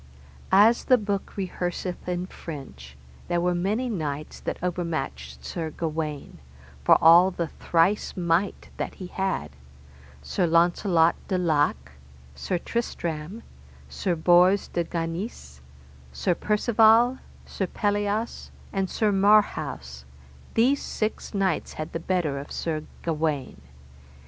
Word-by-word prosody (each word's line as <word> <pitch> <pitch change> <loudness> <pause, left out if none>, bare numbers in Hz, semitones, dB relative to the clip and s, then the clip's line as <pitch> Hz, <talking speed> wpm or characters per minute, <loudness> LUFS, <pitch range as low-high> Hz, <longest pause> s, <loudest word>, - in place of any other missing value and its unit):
As 210 +5 +5
the 255 - +5
book 205 -3 -3
rehearseth 180 -1 -4
in 180 0 -2
French, 70 - -10 0.3
there 175 - +1
were 180 +1 +1
many 205 +8 0
knights 155 -9 -4
that - - -4
overmatched 70 - -4
Sir 160 - -4
Gawaine, 155 -2 -4 0.4
for - - +6
all 170 +3 +7
the 170 -3 -3
thrice 175 +5 +1
might 175 +2 0
that - - -4
he 185 - -8
had: 185 - -2 0.7
Sir 175 - 0
Launcelot 170 0 +3
de 185 - 0
Lake, 145 - +1 0.4
Sir 175 - -2
Tristram, 175 -2 -4 0.5
Sir 180 -3 -1
Bors 180 +4 +4
de 170 - -1
Ganis, 165 - -5 0.5
Sir 65 - 0
Percivale, 225 +5 +4 0.3
Sir 190 - -3
Pelleas, 205 +3 -1 0.2
and 195 -1 -1
Sir 215 -2 +1
Marhaus, 195 - +2 0.5
these 260 +5 +3
six 215 0 -3
knights 190 -4 0
had 155 - -6
the 165 - -2
better 165 -5 -1
of 140 - -9
Sir 155 -2 -3 0.2
Gawaine. 155 - -2
175 Hz, 120 wpm, -25 LUFS, 155-200 Hz, 0.7 s, all